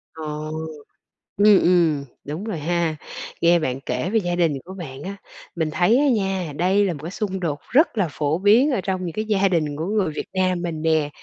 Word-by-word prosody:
À. 160 - -7 1.2
Ừm, 210 -2 +7
ừm, 165 -5 +3 0.2
đúng 155 +7 -5
rồi 210 -8 -4
ha. 170 0 0 0.5
Nghe 170 0 +5
bạn 130 -4 -2
kể 135 +7 -2
về 225 +1 +2
gia 175 -2 -2
đình 165 -4 +2
của 190 - -9
bạn 145 -7 -8
á, 200 +1 -5 0.4
mình 160 -2 -1
thấy 185 +9 +3
á 290 - +3
nha, 190 - 0
đây 190 +5 +2
là 180 - 0
một 145 - -9
cái 170 - -5
xung 195 -2 -3
đột 150 -5 -2
rất 275 -2 +3
là 190 -4 +2
phổ 150 +2 -1
biến 225 +9 +4
ở 235 - 0
trong 185 -1 -2
những 165 - -4
cái 215 0 -2
gia 200 -2 +2
đình 155 -5 0
của 160 +3 -3
người 200 -5 0
Việt - - -4
Nam 185 -2 +1
mình 165 -3 -4
nè. 160 -2 +2
175 Hz, 220 wpm, -22 LUFS, 160-195 Hz, 1.2 s, Ừm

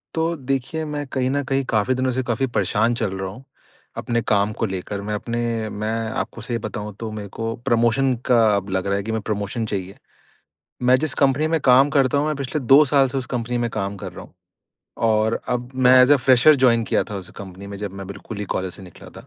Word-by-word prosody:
तो 165 +1 0
देखिए 135 +4 -1
मैं 150 -1 -4
कहीं 130 -1 0
न 145 +2 0
कहीं 135 +1 0
काफ़ी 110 +4 +2
दिनों 130 0 0
से - - +2
काफ़ी 120 +1 0
परेशान 110 +1 +1
चल 115 -5 -1
रहा 95 0 -4
हूँ, 115 +7 -11 0.5
अपने 120 -1 -1
काम 105 -1 +1
को - - +1
लेकर, 95 0 -4
मैं 105 +1 -4
अपने 115 0 -2
मैं 105 +1 -4 0.2
आपको 115 - -4
सही 120 +1 -3
बताऊँ 105 0 -5
तो 115 -1 -5
मेरे 105 -1 -6
को 115 +3 -4
प्रमोशन 120 +3 +2
का 125 -2 +4 0.2
अब 100 0 -3
लग 95 0 -1
रहा 100 0 +1
है 100 - -3
कि 110 - -4
मैं 110 - -2
प्रमोशन 105 +2 -3
चाहिए। 95 -1 -4 0.9
मैं 125 +1 +5
जिस 155 -1 -1
कंपनी 140 +3 +3
में 160 -1 +1
काम 135 +2 +5
करता 135 -1 +2
हूँ, 145 - +1
मैं 155 - 0
पिछले 140 +2 -3
2 135 +4 +6
साल 140 -1 +3
से 135 - -2
उस 130 - -5
कंपनी 120 +1 -2
में 120 0 0
काम 100 0 -3
कर - - -7
रहा - - -9
हूँ - - -19 0.7
और 110 +1 +1
अब 125 0 -2
मैं 130 0 +6
एज़ 130 +3 +5
अ, - - +7
फ्रेशर 130 +3 +5
जॉइन 115 -2 +4
किया - - +1
था 105 - -4
उस 95 -2 -8
कंपनी 95 0 -9
में, 100 0 -7
जब 100 -2 -5
मैं 95 -1 -8
बिल्कुल 100 +2 -8
ही 105 - -3
कॉलेज 95 -1 -3
से 95 - -11
निकला 90 -3 -13
था। - - -19
115 Hz, 235 wpm, -22 LUFS, 105-130 Hz, 0.9 s, अ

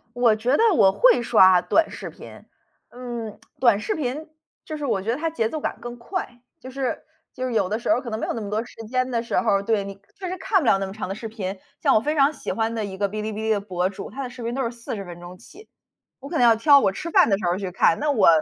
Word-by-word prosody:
我 245 -3 +4
觉 245 +6 +1
得 450 -3 +4
我 195 - +5
会 - - +4
刷 190 -6 +6
短 325 0 +2
视 - - -7
频， - - -13 0.5
嗯， 240 -3 -7 0.2
短 235 -5 +5
视 215 - -2
频， 300 +2 -4 0.4
就 310 - -6
是 295 - -5
我 235 -8 0
觉 215 - -2
得 240 - 0
它 325 +3 -2
节 230 -9 -1
奏 310 +6 -5
感 - - -3
更 240 0 -7
快， 245 -1 -6 0.2
就 255 - -11
是 260 -1 -3 0.3
就 255 0 -4
是 255 - -3
有 205 -5 +1
的 215 +3 -1
时 230 - 0
候 230 - +2
可 240 -2 -7
能 220 - -3
没 - - -3
有 - - -2
那 230 - -4
么 205 -2 -6
多 215 +2 -1
时 - - -15
间 255 +2 0
的 230 -1 -1
时 235 - -1
候 225 - +1
儿， 195 - +2
对， 205 -1 0
你 195 0 -7 0.2
确 375 -2 -5
实 370 - -4
看 405 - +2
不 275 - -3
了 195 - +4
那 195 - -2
么 190 - -8
长 210 -2 -5
的 195 - -3
视 225 +2 -7
频。 200 -3 -5 0.2
像 - - +3
我 - - +5
非 300 +6 -2
常 280 +1 +4
喜 - - -7
欢 225 0 -1
的 220 - -2
一 190 -2 -7
个 200 0 +1
哔 210 +2 -5
哩 215 - -3
哔 - - -7
哩 220 +1 -2
的 210 -2 +2
博 185 -2 -1
主， 195 - -8
他 275 - -6
的 250 - -6
视 245 0 -10
频 235 +1 -3
都 265 0 -1
是 230 - -1
40 230 -4 -6
分 175 -1 -10
钟 175 +1 -11
起， 425 - -16 0.5
我 275 - -10
可 325 - -4
能 - - +2
要 230 -1 +6
挑 280 +4 +6
我 195 - +2
吃 315 - -6
饭 - - +5
儿 - - -2
的 195 - +2
时 195 - -7
候 175 - +2
儿 185 - -2
去 195 -2 -4
看。 175 -2 +3
那 300 - +1
我， 225 -9 +4
230 Hz, 325 characters per minute, -23 LUFS, 200-265 Hz, 0.5 s, 刷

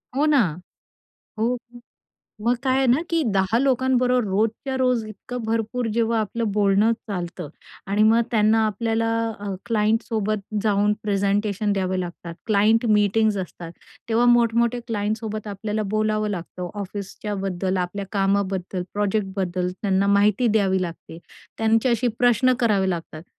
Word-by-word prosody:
हो 285 +3 +2
ना. 300 -2 +4 1.0
हो. 240 +3 +1 0.8
मग 235 +3 +2
काय 260 -1 +2
आहे 270 -1 +2
ना, 250 +6 +4
की 335 -1 +1
10 190 +3 +2
लोकांबरोबर 255 -1 +2
रोजच्या 220 +7 -1
रोज 250 -3 +1
इतकं 240 +4 -7
भरपूर 225 +2 -1
जेव्हा 230 0 +1
आपलं 220 +1 -2
बोलणं 205 +2 +3 0.2
चालतं 180 -4 -5 0.4
आणि 210 +2 +3
मग 225 +2 +5
त्यांना 220 0 +3
आपल्याला 225 +2 -1 0.3
अ, 205 - -6 0.2
क्लायंटसोबत 215 -1 0 0.2
जाऊन 205 -1 +2
प्रेझेंटेशन 205 0 0
द्यावे 185 -1 -1
लागतात, 175 -1 -6
क्लायंट 220 +2 +3
मीटिंग्ज 210 0 +3
असतात, 175 -2 -6 0.4
तेव्हा 230 +2 +3
मोठमोठ्या 235 0 +3
क्लायंटसोबत 215 0 -3
आपल्याला 210 +1 -3
बोलावं 215 0 0
लागतं, 180 -1 -5
ऑफिसच्याबद्दल, 195 -1 -4
आपल्या 185 +2 -3
कामाबद्दल, 195 -2 0
प्रोजेक्टबद्दल, 195 -3 -1
त्यांना 195 -1 +1
माहिती 205 +4 +3
द्यावी 195 -4 +2
लागते. 165 -2 -7 0.4
त्यांच्याशी 225 +2 +2
प्रश्न 245 +1 +4
करावे 205 -5 +2
लागतात. 165 -3 -5
210 Hz, 125 wpm, -23 LUFS, 195-230 Hz, 1.0 s, मग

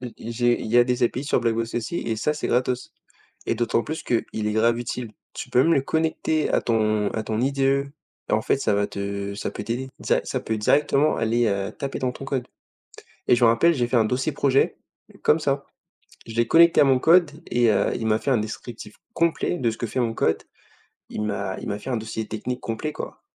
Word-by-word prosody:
E 125 -2 -7
i 115 - -7
j'ai 120 0 +2
il - - -5
y 115 +3 +3
a 120 - +7
des 125 0 -1
API 125 +3 0
sur - - +1
BlackBox 115 0 -1
aussi 120 +8 -2
et 115 - -2
ça 150 +8 0
c'est 150 - -4
gratos 125 +1 0 0.6
et - - +1
d'autant 115 0 0
plus 160 +1 -5
qu'il 120 -2 0 0.2
est 105 - 0
grave 115 +2 +2
utile. 120 -1 -5 0.2
Tu - - -7
peux 125 - +4
même 165 - +3
le 140 - +3
connecter 160 +1 0
à - - +2
ton 110 -3 +1
à 110 - -2
ton 110 0 -2
IDE 135 +1 +1 0.4
et - - -3
en 110 0 +2
fait - - +2
ça 110 -6 +1
va 100 0 +1
te 100 0 -4
ça 100 - -4
peut - - -5
t'aider, 120 +4 -3
dza - - +2
ça - - -2
peut 110 - -2
directement 145 +6 +2
aller, 115 +1 +1
heu, 100 -2 -1
taper 140 -1 -5
dans 130 -1 0
ton 135 - -9
code 130 -2 -2 0.8
et 125 - +6
je 120 - +1
m'en 115 - +7
rappelle, 165 +9 +4
j'ai 120 -3 0
fait 125 - -1
un 110 - +4
dossier 130 +7 0
projet 135 -1 +2 0.5
comme 155 - +3
ça. 140 -2 -1 0.6
Je 115 - -8
l'ai 115 0 +2
connecté 170 0 +6
à - - +8
mon 135 -2 +4
code 170 0 +5 0.2
et 120 -1 +2
heu, - - +2
il 115 - -3
m'a 110 0 +2
fait 140 - -1
un 125 - +4
descriptif 110 0 -6 0.2
complet 170 +1 0
de 120 -7 +1
ce 110 - -8
que 120 - -3
fait 130 - -3
mon 115 -2 0
code. 80 - 0 0.7
Il - - -4
m'a 100 -3 -2
il - - -6
m'a 100 - -2
fait 120 - -7
un 125 - 0
dossier 110 0 -4
technique 125 +3 -4
complet, 115 +7 -4
quoi. - - -8
120 Hz, 235 wpm, -24 LUFS, 110-135 Hz, 0.8 s, à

